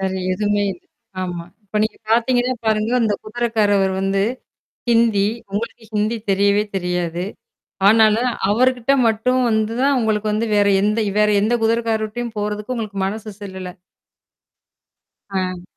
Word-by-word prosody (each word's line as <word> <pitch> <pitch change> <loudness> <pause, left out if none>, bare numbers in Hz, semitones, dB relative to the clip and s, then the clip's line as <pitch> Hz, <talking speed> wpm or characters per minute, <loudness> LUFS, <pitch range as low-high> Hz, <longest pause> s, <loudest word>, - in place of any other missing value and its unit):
வேற 190 -1 -1 0.2
எதுவுமே 205 +1 0
இல்ல. 180 - -15 0.4
ஆமா. 175 -2 -4 0.2
இப்ப 210 +2 -3
நீங்கப் 220 0 -6
பாத்தீங்கன்னா 245 +2 +2
பாருங்க, 215 0 +1
அந்தக் 215 -3 0
குதிரைக்காரவரு 215 -4 +1
வந்து 195 0 +1 0.7
ஹிந்தி. 230 -4 +3 0.2
உங்களுக்கு 225 +3 -4
ஹிந்தி 215 +2 0
தெரியவே 200 +1 +3
தெரியாது. 180 -2 -2 0.6
ஆனாலும் 220 +3 +5 0.2
அவருகிட்ட 250 +3 +2 0.2
மட்டும் 230 +4 +1
வந்துதான், 230 +6 +1
உங்களுக்கு 215 -2 0
வந்து 220 +2 0
வேற 205 0 +4
எந்த 210 +2 +1 0.2
வேற 210 0 +4
எந்தக் 230 +3 +1
குதிரைக்காரர்ட்டயும் 225 0 -1
போறதுக்கு 210 +3 -3
உங்களுக்கு 215 -4 -4
மனசு 215 +2 -4
செல்லல. 190 -2 -7 1.5
அ. 185 -2 -3
215 Hz, 120 wpm, -20 LUFS, 200-230 Hz, 1.5 s, ஆனாலும்